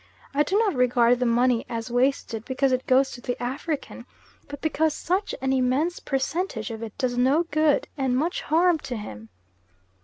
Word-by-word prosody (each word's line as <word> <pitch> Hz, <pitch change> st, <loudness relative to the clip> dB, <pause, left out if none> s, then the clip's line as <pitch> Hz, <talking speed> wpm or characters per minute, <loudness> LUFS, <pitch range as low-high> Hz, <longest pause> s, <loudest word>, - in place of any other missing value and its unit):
I 285 Hz, -, +2 dB
do 380 Hz, +7 st, +1 dB
not 435 Hz, -2 st, +2 dB
regard 245 Hz, -2 st, +3 dB
the 250 Hz, -, +1 dB
money 240 Hz, 0 st, +2 dB
as 230 Hz, +1 st, -4 dB
wasted 245 Hz, -3 st, 0 dB
because 265 Hz, +2 st, 0 dB
it 255 Hz, 0 st, -1 dB
goes 265 Hz, +1 st, +4 dB
to 245 Hz, -, -9 dB
the 245 Hz, 0 st, -4 dB
African, 275 Hz, +5 st, -4 dB, 0.4 s
but 285 Hz, -1 st, -8 dB
because 315 Hz, -1 st, 0 dB
such 375 Hz, +4 st, -1 dB
an 265 Hz, 0 st, +1 dB
immense 265 Hz, +7 st, +1 dB
percentage 270 Hz, -, -2 dB
of 225 Hz, 0 st, -7 dB
it 225 Hz, -2 st, -7 dB
does 245 Hz, -1 st, -1 dB
no 275 Hz, +7 st, +3 dB
good 310 Hz, -1 st, +2 dB
and 260 Hz, -2 st, 0 dB
much 325 Hz, +6 st, -1 dB
harm 335 Hz, +1 st, +3 dB
to 250 Hz, -, -6 dB
him. 110 Hz, -, -8 dB
260 Hz, 180 wpm, -25 LUFS, 245-305 Hz, 0.4 s, goes